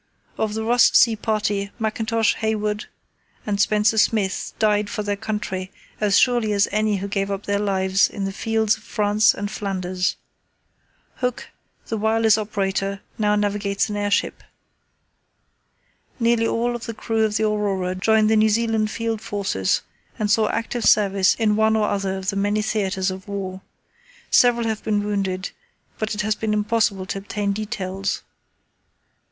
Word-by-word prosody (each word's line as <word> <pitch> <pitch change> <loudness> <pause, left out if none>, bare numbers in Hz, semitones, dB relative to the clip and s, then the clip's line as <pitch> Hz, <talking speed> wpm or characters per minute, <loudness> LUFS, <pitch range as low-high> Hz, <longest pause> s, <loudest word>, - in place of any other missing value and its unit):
Of 215 -1 -2
the 220 - -2
Ross 240 +2 +5
Sea 230 -2 +5
Party, 210 -2 -1
Mackintosh, 220 0 0
Hayward, 215 0 -1 0.6
and 205 -1 0
Spencer 210 +1 +3
Smith 210 -3 +1
died 210 -2 +2
for 210 - -3
their 205 0 -1
country 200 -3 -4 0.3
as 205 -2 +3
surely 240 -4 +3
as 200 0 +3
any 215 0 +1
who 195 +1 -4
gave 195 0 -2
up 200 0 -3
their 200 0 0
lives 190 -1 +2
on 200 - -5
the 195 - -2
fields 220 0 +1
of - - -18
France 210 -1 +2
and 205 +1 -4
Flanders. 185 -3 -2 1.0
Hooke, 250 -1 -3 0.4
the 225 - -3
wireless 220 0 +3
operator, 195 -2 -2 0.2
now 210 -1 +2
navigates 205 0 0
an 210 - -3
airship. 205 0 0 1.8
Nearly 230 -1 +2
all 240 +2 0
of 240 - -7
the 230 - -5
crew 225 0 -1
of 215 -1 +1
the 220 - 0
Aurora 200 -4 0
joined 215 +3 +3
the 220 - +3
New 215 0 +4
Zealand 220 -1 +1
Field 225 -1 -3
Forces 195 - -1 0.3
and 210 -1 0
saw 215 0 +3
active 230 +1 -2
service 200 -2 +4
in 215 -2 +1
one 220 0 +3
or 215 -1 +2
other 195 -1 -1
of 190 +1 -2
the - - -6
many 205 +2 0
theatres 190 -3 -1
of 190 +1 -8
war. 190 -2 -5 0.7
Several 240 -1 +4
have 220 -1 -2
been 205 -1 0
wounded, 195 -2 -2 0.5
but 215 0 -2
it 210 - -1
has 215 +1 +1
been 215 0 -2
impossible 210 -3 +1
to 195 - -4
obtain 200 0 -2
details. 195 -2 -3
210 Hz, 160 wpm, -22 LUFS, 200-220 Hz, 1.8 s, Ross